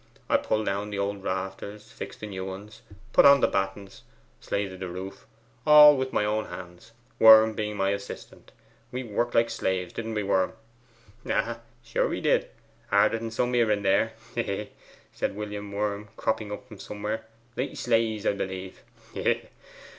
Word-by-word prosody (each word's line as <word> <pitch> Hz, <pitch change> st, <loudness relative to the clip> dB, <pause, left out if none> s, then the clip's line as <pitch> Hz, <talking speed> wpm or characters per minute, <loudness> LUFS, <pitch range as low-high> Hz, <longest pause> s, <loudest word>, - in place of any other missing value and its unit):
I -, -, +4 dB
pulled 110 Hz, 0 st, -1 dB
down 100 Hz, +1 st, -2 dB
the 105 Hz, -, -4 dB
old 100 Hz, 0 st, -2 dB
rafters, 95 Hz, +3 st, -5 dB
fixed -, -, -8 dB
the -, -, -4 dB
new 95 Hz, -3 st, -5 dB
ones, 95 Hz, +3 st, -8 dB, 0.3 s
put -, -, +7 dB
on 140 Hz, 0 st, +8 dB
the -, -, +4 dB
battens, 95 Hz, 0 st, -3 dB, 0.4 s
slated 95 Hz, -2 st, -3 dB
the 95 Hz, -, -4 dB
roof, 95 Hz, +2 st, -8 dB, 0.4 s
all 150 Hz, -1 st, +9 dB
with 130 Hz, -1 st, -2 dB
my 105 Hz, -, +1 dB
own 110 Hz, +1 st, 0 dB
hands, 90 Hz, +5 st, -10 dB, 0.3 s
Worm 110 Hz, 0 st, +8 dB
being 105 Hz, 0 st, -3 dB
my 95 Hz, 0 st, +1 dB
assistant. 100 Hz, 0 st, -7 dB, 0.4 s
We 130 Hz, +1 st, -4 dB
worked 120 Hz, +1 st, -2 dB
like 115 Hz, 0 st, +3 dB
slaves, 90 Hz, -2 st, -2 dB
didn't 115 Hz, -1 st, -4 dB
we, 105 Hz, -, 0 dB
Worm?' 95 Hz, 0 st, +1 dB, 0.7 s
'Ay, 115 Hz, 0 st, -1 dB, 0.3 s
sure, 120 Hz, -, 0 dB
we -, -, -3 dB
did; -, -, +2 dB, 0.4 s
harder 105 Hz, +3 st, +3 dB
than 115 Hz, 0 st, -4 dB
some 120 Hz, +2 st, -1 dB
here 120 Hz, -2 st, +3 dB
and 100 Hz, -1 st, 0 dB
there 100 Hz, +4 st, +3 dB, 0.2 s
hee, 120 Hz, -, 0 dB
hee!' 105 Hz, -1 st, -4 dB, 0.4 s
said -, -, -2 dB
William 105 Hz, -1 st, -6 dB
Worm, 105 Hz, 0 st, -2 dB
cropping 110 Hz, -1 st, -1 dB
up 105 Hz, -, -7 dB
from 105 Hz, -5 st, -12 dB
somewhere. 105 Hz, +2 st, -5 dB, 0.3 s
'Like 130 Hz, -, -3 dB
slaves, 115 Hz, -3 st, +1 dB
'a -, -, +3 dB
b'lieve 95 Hz, -1 st, -5 dB, 0.3 s
hee, -, -, -4 dB
hee! -, -, +2 dB
105 Hz, 175 wpm, -27 LUFS, 95-110 Hz, 0.7 s, all